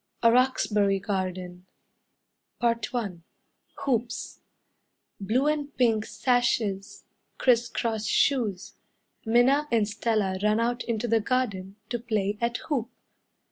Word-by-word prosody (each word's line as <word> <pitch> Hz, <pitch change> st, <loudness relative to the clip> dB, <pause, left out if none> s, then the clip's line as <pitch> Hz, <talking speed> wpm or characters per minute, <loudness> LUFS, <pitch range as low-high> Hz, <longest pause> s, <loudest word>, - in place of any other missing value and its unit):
A 230 Hz, -, +7 dB
Roxbury 210 Hz, -6 st, +2 dB
Garden 185 Hz, -2 st, -4 dB, 0.9 s
I 235 Hz, -1 st, +3 dB, 1.1 s
Hoops 245 Hz, -2 st, -2 dB, 0.8 s
Blue 220 Hz, +8 st, +1 dB
and 295 Hz, -2 st, -1 dB
pink 225 Hz, -4 st, +2 dB
sashes, 215 Hz, -3 st, 0 dB, 0.3 s
Criss 240 Hz, -2 st, +3 dB
cross 220 Hz, -3 st, -2 dB
shoes, 225 Hz, -10 st, +1 dB, 0.5 s
Minna 260 Hz, +6 st, +4 dB
and 220 Hz, -3 st, +3 dB
Stella 205 Hz, -3 st, -1 dB
run 210 Hz, +1 st, +2 dB
out 240 Hz, +1 st, 0 dB
into 235 Hz, 0 st, -2 dB
the 230 Hz, 0 st, +3 dB
garden 205 Hz, -6 st, -1 dB
To 240 Hz, -, -2 dB
play 210 Hz, -3 st, -1 dB
at 235 Hz, +1 st, 0 dB
hoop. 250 Hz, -7 st, -1 dB
230 Hz, 105 wpm, -27 LUFS, 205-245 Hz, 1.1 s, A